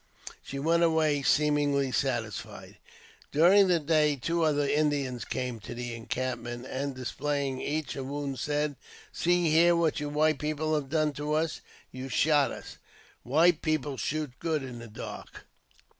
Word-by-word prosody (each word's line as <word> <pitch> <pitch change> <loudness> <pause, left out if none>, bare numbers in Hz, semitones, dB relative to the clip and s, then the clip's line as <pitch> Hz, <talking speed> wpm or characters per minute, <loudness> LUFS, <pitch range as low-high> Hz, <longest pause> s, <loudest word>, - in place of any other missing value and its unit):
She 140 - -7
went 165 +4 +2
away 160 -3 +3
seemingly 145 -2 +2
satisfied. 115 -4 -3 0.5
During 185 +6 +6
the 175 -2 +3
day 150 -1 +2
two 170 +6 -1
other 145 -2 +2
Indians 140 -4 0
came 125 -3 -4
to 105 - -8
the 120 0 -5
encampment, 120 +1 -4
and, 135 +1 -4
displaying 135 +1 -2
each 155 +1 -2
a 135 - -4
wound, 140 0 -4
said, 145 -1 -1 0.4
See 175 -2 +2
here 170 +2 +5
what 165 -2 +1
you 150 0 -3
white 150 0 +2
people 155 +1 -1
have 145 -3 -1
done 155 -1 +1
to 150 +1 -3
us; 155 +1 -1 0.3
you 130 +1 -7
shot 145 +1 +3
us; - - -9 0.4
white 160 +6 +3
people 150 -3 -1
shoot 150 +1 -2
good 160 -4 -1
in 125 -2 -7
the 115 - -9
dark." 105 - -9
145 Hz, 155 wpm, -29 LUFS, 130-155 Hz, 0.5 s, During